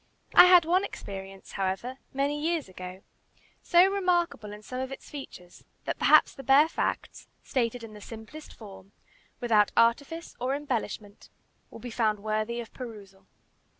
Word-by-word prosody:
I - - +10
had 360 -2 +7
one 360 +4 +2
experience, 195 - -8
however, 195 +7 -3
many 285 +2 -1
years 330 -1 -1
ago, 185 0 -9 0.6
so 350 +1 +5
remarkable 355 - 0
in 210 0 -10
some 255 +3 -6
of 260 +1 -4
its 270 - -10
features, 180 -11 -10 0.2
that - - -3
perhaps - - +5
the - - -9
bare 270 +4 +5
facts, - - -3 0.2
stated 240 -2 -1
in 220 -1 -9
the 210 - -11
simplest 225 +9 -10
form, 195 -2 -13 0.5
without 220 -4 +3
artifice 285 +8 +1
or 255 +3 0
embellishment, 225 -7 -4 0.4
will - - -11
be 245 - -8
found 220 -2 +1
worthy 215 +3 -2
of 235 - -8
perusal. 205 -6 -10
235 Hz, 150 wpm, -28 LUFS, 210-290 Hz, 0.6 s, I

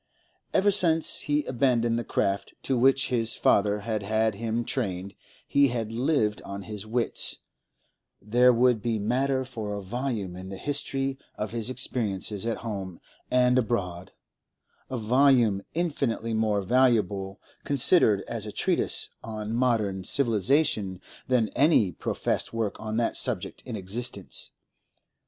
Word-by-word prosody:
Ever 205 +2 +3
since 165 -5 +3
he 150 0 0
abandoned 120 -3 +1
the - - -3
craft 100 -3 -1
to 135 - 0
which 135 +2 +3
his 115 -2 +1
father 105 0 +2
had 110 0 -2
had 110 +2 +1
him 115 +3 -2
trained, 100 -7 -3 0.3
he 140 0 +4
had 115 -3 -3
lived 115 -3 0
on 100 0 -7
his 105 0 -7
wits; 120 +1 0 0.8
there 120 +5 +4
would 120 -2 +3
be 115 0 -1
matter 130 +5 0
for 110 -5 -5
a 100 - -5
volume 110 -3 -3
in 95 +1 -8
the 95 - -6
history 135 0 -1 0.2
of 105 - -4
his 115 0 -3
experiences 110 -5 -2
at 115 - -1
home 95 -5 -5 0.3
and 125 0 +4
abroad, 95 -6 -2 0.8
a 130 - -3
volume 120 -3 +3
infinitely 135 -9 -1
more 110 -2 +1
valuable 105 -5 +1 0.2
considered 135 - +4
as 110 -2 -5
a - - -5
treatise - - +1
on 110 -1 -5
modern 110 -6 +1
civilisation 110 - +1 0.3
than 125 -4 +2
any 140 - +3
professed - - -2
work 110 -3 -2
on 110 0 -4
that 115 - 0
subject - - -3
in 120 - -4
existence. 100 +1 -5
115 Hz, 140 wpm, -27 LUFS, 105-130 Hz, 0.8 s, he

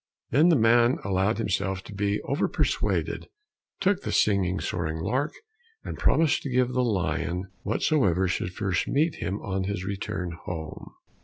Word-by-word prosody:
Then 150 +8 +5
the 170 - +5
man 120 +1 +4
allowed 95 +2 +1
himself 95 -3 -1
to 105 - -10
be 100 +1 0
over 140 - 0
persuaded, - - -1 0.5
took 195 0 +2
the - - -3
singing, 95 -3 +2
soaring 80 -2 -2
lark, 125 - -1 0.5
and - - -5
promised 160 -2 +3
to 140 - -4
give 125 0 +2
the 125 - +2
lion 90 - -1
whatsoever 100 - +2
should 90 0 -2
first 95 0 -1
meet 155 +3 +1
him 95 +4 -3
on 95 -1 -2
his 95 -2 -3
return 95 -2 -3
home. 80 -3 -6
100 Hz, 155 wpm, -27 LUFS, 95-125 Hz, 0.5 s, Then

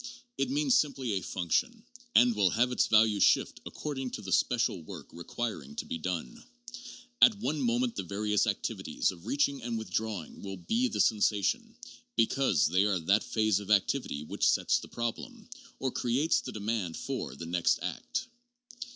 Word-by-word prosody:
It - - -1
means 280 -1 +2
simply 140 - +1
a 95 - -1
function, 155 - -1 0.3
and 120 -1 +6
will 100 -3 +3
have 120 +6 +1
its 125 - +2
value 110 -1 +4
shift - - +3
according 135 -4 -4
to - - -11
the 95 - -6
special 115 -6 +1
work 80 - -9
requiring 85 - -5
to - - -4
be 80 - -4
done. 85 -7 -4 0.8
At 220 - +8
one 155 -8 -2
moment 120 0 +1
the - - -2
various 105 +3 0
activities - - -1
of 90 +2 -13
reaching 140 0 +1
and 120 0 -3
withdrawing 110 -5 -4
will 95 -1 -6
be 230 - 0
the 235 - -4
sensation, 110 - +1 0.4
because 115 - +2
they 95 +5 +3
are 100 -3 +1
that 95 +5 +2
phase 110 -3 +1
of 100 -1 -9
activity 105 - +1
which 75 - +1
sets - - +2
the - - -10
problem, 210 - -5 0.3
or 130 -1 -2
creates 130 +8 +1
the - - -6
demand 105 -5 -3
for, 65 - -4
the 80 - -7
next 85 0 +1
act. - - -3
110 Hz, 170 wpm, -30 LUFS, 95-130 Hz, 0.8 s, At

